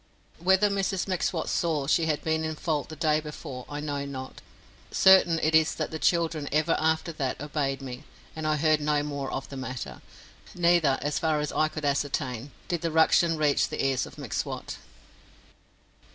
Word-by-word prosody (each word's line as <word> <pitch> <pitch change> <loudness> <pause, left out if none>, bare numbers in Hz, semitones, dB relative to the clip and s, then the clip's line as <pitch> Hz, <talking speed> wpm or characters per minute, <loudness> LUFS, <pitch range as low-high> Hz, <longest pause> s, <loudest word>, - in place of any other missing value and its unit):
Whether 190 +4 +3
Mrs 195 -1 -1
M'Swat 180 -3 -1
saw 155 -5 0
she 160 +3 +2
had 150 -2 -1
been 160 0 0
in 160 0 -2
fault 150 -2 -2
the 155 - -7
day 155 0 +2
before 150 -4 -8
I 145 - -5
know 145 -2 -3
not; 130 -2 -7 0.5
certain 190 - +6
it 155 +1 +2
is 160 0 +4
that - - -3
the 160 - -4
children 165 -4 +1
ever 155 +2 +2
after 160 +1 +1
that 140 -5 -3
obeyed 140 -2 -2
me, 130 +2 -7 0.3
and 160 -1 -3
I 155 - +2
heard 155 0 +2
no 150 0 +1
more 140 -2 -4
of 135 0 -4
the 140 - -7
matter; 130 - -6 0.5
neither, 170 -6 +3
as 145 +1 -1
far 160 -3 +1
as 150 - -2
I 155 - +2
could 155 -1 -6
ascertain, 140 -3 -1 0.2
did 175 -2 -2
the 165 - 0
"ruction" 165 +1 +4
reach 150 -2 +2
the - - -2
ears 135 -2 +1
of - - -14
M'Swat. - - -4
155 Hz, 180 wpm, -27 LUFS, 140-160 Hz, 0.5 s, certain